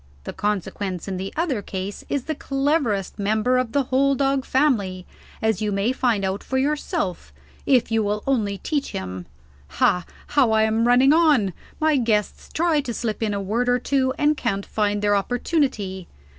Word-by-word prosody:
The - - -6
consequence, 200 -3 -3
in 190 -1 -3
the 190 +1 -4
other 300 -9 -1
case, 195 +1 -5
is 280 -3 -1
the 315 - -2
cleverest 275 - -1
member 220 +5 +2
of 250 -3 -2
the 280 +2 +2
whole 275 +2 +2
dog 270 0 +1
family 205 -10 +1 0.4
as 220 -1 +1
you 210 -1 0
may 200 +4 +1
find 235 -6 +1
out 190 +1 -2
for 260 - -2
yourself 295 - -2 0.4
if 255 -4 +3
you 225 0 +2
will 210 0 -1
only 215 -7 0
teach 290 +6 -3
him. 95 -1 -5 0.5
Ha 180 - +3 0.2
how 280 -5 +3
I 220 0 +4
am 220 +2 +2
running 255 +4 +5
on. 295 - +3 0.3
My 310 -2 +3
guests 220 -4 -1
try 325 -2 +2
to 240 -4 -5
slip 225 -2 -3
in 210 -2 0
a - - -1
word 225 +6 -1
or 245 - +4
two, 260 +1 +1
and 300 +1 +3
can't 200 -8 -2
find 205 -1 -1
their 205 0 +3
opportunity. 210 - -1
230 Hz, 180 wpm, -23 LUFS, 200-275 Hz, 0.5 s, running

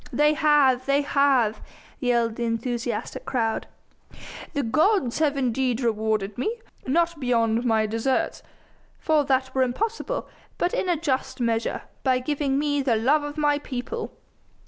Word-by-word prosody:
"They 295 +4 +3
have! 290 -5 +3
They 280 +1 +3
have!" 270 -7 +2 0.4
yelled 235 -4 +1
the 240 - -3
enthusiastic 230 0 -3
crowd. 225 -4 -1 0.9
"The 285 -2 0
gods 305 - +2
have 295 -3 +2
indeed 255 -1 0
rewarded 215 -3 -1
me 445 - -1 0.3
not 335 +3 +1
beyond 235 -2 +1
my 220 -2 +3
deserts, 225 +5 -1 0.6
for 310 -2 +2
that 260 -1 0
were 265 - +1
impossible 445 - -1 0.3
but 355 - 0
in 370 - 0
a 345 - +2
just 280 -6 -2
measure, 230 -1 -1 0.2
by 260 -2 +2
giving 275 +1 -1
me 290 0 +1
the 260 -4 +2
love 265 +8 +3
of 290 +1 -6
my 295 -1 +2
people." 290 - -5
260 Hz, 145 wpm, -25 LUFS, 235-295 Hz, 0.9 s, They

